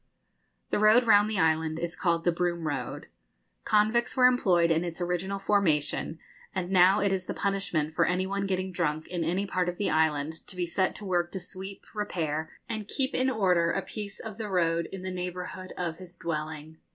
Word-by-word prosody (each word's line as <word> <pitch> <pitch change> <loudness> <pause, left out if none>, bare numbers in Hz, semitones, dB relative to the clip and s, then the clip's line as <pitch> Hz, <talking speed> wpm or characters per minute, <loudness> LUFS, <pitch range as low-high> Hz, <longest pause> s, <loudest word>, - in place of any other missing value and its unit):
The - - +2
road 215 +4 +6
round 210 -2 +5
the 215 - -1
island 160 -2 +2
is 170 +1 -3
called 170 -2 +1
the 175 - +3
Broom 170 -1 -1
Road. 135 -5 -3 0.6
Convicts 220 +4 +2
were 250 - +6
employed 185 -9 +4
in 165 +1 +2
its 170 -1 -5
original 180 +2 -1
formation, 165 -6 +1 0.4
and 185 -1 -2
now 190 +2 +6
it 200 -1 +2
is 190 -1 -1
the - - -3
punishment 190 -6 -1
for - - +3
any 180 +2 +1
one 200 +1 -2
getting 185 0 -1
drunk 155 -2 -1
in 175 -2 -2
any 180 +5 0
part 185 -2 0
of 175 - -5
the 205 - 0
island 160 0 0
to 190 - -6
be 180 -1 -1
set 185 +2 0
to 210 - -9
work 175 -2 0
to 190 - -2
sweep, 190 +2 -7
repair, 160 -7 -2 0.2
and 215 -2 -4
keep 265 +3 -1
in 260 +1 +2
order 180 -8 +2
a - - -1
piece 205 -2 -6
of 220 -1 -8
the 215 -2 -4
road 170 -3 +1
in 190 -1 -7
the 185 - -3
neighbourhood 180 +1 -5
of 170 -2 -3
his 180 -1 -12
dwelling. 155 -1 -5
180 Hz, 200 wpm, -28 LUFS, 165-200 Hz, 0.6 s, road